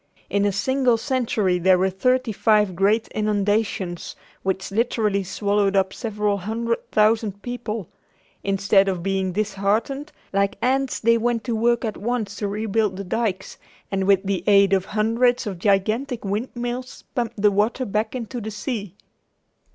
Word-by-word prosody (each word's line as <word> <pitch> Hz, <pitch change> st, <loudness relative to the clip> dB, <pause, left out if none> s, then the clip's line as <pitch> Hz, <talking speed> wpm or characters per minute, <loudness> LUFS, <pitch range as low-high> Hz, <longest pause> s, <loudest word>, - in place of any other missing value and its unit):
In 200 Hz, 0 st, +2 dB
a 205 Hz, -, +2 dB
single 250 Hz, +4 st, +2 dB
century 225 Hz, -7 st, 0 dB
there 185 Hz, +1 st, +5 dB
were 190 Hz, +1 st, +1 dB
thirty 255 Hz, +5 st, +1 dB
five 210 Hz, -2 st, +2 dB
great 205 Hz, +5 st, +2 dB
inundations 205 Hz, -4 st, -1 dB, 0.3 s
which 190 Hz, 0 st, -2 dB
literally 210 Hz, -2 st, +1 dB
swallowed 200 Hz, +1 st, 0 dB
up 190 Hz, -1 st, +2 dB
several 210 Hz, -3 st, -1 dB
hundred 230 Hz, +4 st, -3 dB
thousand 215 Hz, -2 st, +2 dB
people. 230 Hz, -6 st, -4 dB, 0.6 s
Instead 195 Hz, 0 st, +3 dB
of 185 Hz, -3 st, -2 dB
being 190 Hz, -1 st, 0 dB
disheartened, 215 Hz, -, -1 dB, 0.2 s
like 200 Hz, 0 st, +1 dB
ants, 265 Hz, +1 st, 0 dB
they 230 Hz, +1 st, +3 dB
went 235 Hz, -1 st, 0 dB
to 235 Hz, -3 st, -2 dB
work 235 Hz, +2 st, +2 dB
at 215 Hz, -, -3 dB
once 220 Hz, -2 st, -2 dB
to 205 Hz, -, -2 dB
rebuild 210 Hz, -1 st, -1 dB
the 200 Hz, -, -4 dB
dykes, 195 Hz, -1 st, -2 dB, 0.3 s
and 195 Hz, -1 st, 0 dB
with 195 Hz, -1 st, +4 dB
the 190 Hz, -3 st, -1 dB
aid 200 Hz, -1 st, +5 dB
of 190 Hz, -1 st, +2 dB
hundreds 230 Hz, +4 st, +1 dB
of 195 Hz, -5 st, -5 dB
gigantic 215 Hz, +6 st, 0 dB
windmills 240 Hz, +4 st, -4 dB
pumped 235 Hz, -4 st, -2 dB
the 205 Hz, 0 st, +4 dB
water 215 Hz, +6 st, +1 dB
back 215 Hz, +3 st, -1 dB
into 245 Hz, 0 st, -5 dB
the 220 Hz, -, -4 dB
sea. 210 Hz, -3 st, -5 dB
210 Hz, 150 wpm, -23 LUFS, 195-235 Hz, 0.6 s, there